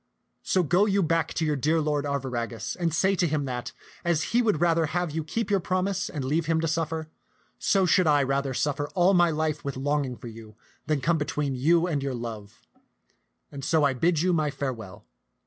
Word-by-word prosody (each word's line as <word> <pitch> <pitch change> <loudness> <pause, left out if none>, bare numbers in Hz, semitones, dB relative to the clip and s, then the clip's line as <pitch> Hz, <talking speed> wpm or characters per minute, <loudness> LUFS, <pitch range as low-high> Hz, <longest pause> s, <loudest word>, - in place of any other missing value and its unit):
So 185 - +1
go 180 +6 +3
you 200 -1 +2
back 165 0 +1
to 160 - 0
your 150 -1 +1
dear 155 +4 +1
lord 150 -1 0
Arviragus, 125 -5 -3
and 170 -2 -1
say 190 +5 +2
to 175 - +2
him 150 -2 -1
that, 125 -2 -4 0.3
as 170 -3 +1
he 240 - +5
would 210 -9 +1
rather 165 -1 +2
have 175 +1 -2
you 160 +1 -2
keep 205 +6 -3
your 200 - +3
promise 185 +2 -1
and 145 -5 -4
leave 155 +4 0
him 165 -1 +2
to 165 - 0
suffer, 160 0 -2 0.5
so 195 -2 +2
should 180 0 +3
I 145 -2 +4
rather 135 0 -1
suffer 145 +1 -1
all 185 +2 +4
my 175 -2 +5
life 155 -1 -1
with 140 -2 -4
longing 140 -2 -1
for - - -10
you 110 -1 -11 0.3
than 155 -3 0
come 165 +3 +1
between 150 -1 -2
you 165 +7 +3
and 155 -6 -1
your 135 -2 -2
love; 110 -4 -7 0.9
and 140 -2 -8
so 160 +2 +2
I 140 -2 +3
bid 165 +5 +1
you 180 0 +2
my 155 -3 +1
farewell." 115 -8 -6
155 Hz, 210 wpm, -26 LUFS, 140-170 Hz, 0.9 s, he